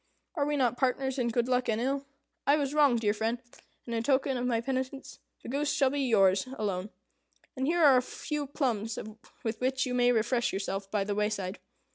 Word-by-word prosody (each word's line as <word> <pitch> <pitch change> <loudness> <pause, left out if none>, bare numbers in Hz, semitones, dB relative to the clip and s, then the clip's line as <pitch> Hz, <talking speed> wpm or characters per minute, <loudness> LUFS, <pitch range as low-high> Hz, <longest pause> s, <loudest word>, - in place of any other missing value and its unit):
Are 290 -5 0
we 295 0 0
not 245 -3 +1
partners 265 0 0
in 245 - +1
good 235 +1 0
luck 250 -1 +1
and 220 0 +1
ill? 275 +3 -1 0.4
I 285 - +6
was 285 -2 -1
wrong, 290 -4 +5
dear 215 -3 +1
friend; 225 +2 -1 0.5
and, 235 - -5
in 225 - 0
token 265 +2 +1
of 250 0 -1
my 235 -2 +1
penitence, 260 +2 -4 0.2
the - - -9
goose 285 +3 0
shall 270 -2 +2
be 285 0 -1
yours 200 -4 +3
alone. 200 -2 -2 0.7
And 265 0 -1
here 340 +1 +2
are 270 -3 +7
a - - +4
few 295 +3 -4
plums 235 -6 -1 0.5
with 225 +1 -3
which 260 0 +1
you 250 - -3
may 245 0 +4
refresh 235 +1 +1
yourself 195 0 -3
by 205 -1 0
the 205 +1 -2
wayside. 210 -2 -2
250 Hz, 205 wpm, -29 LUFS, 220-270 Hz, 0.7 s, are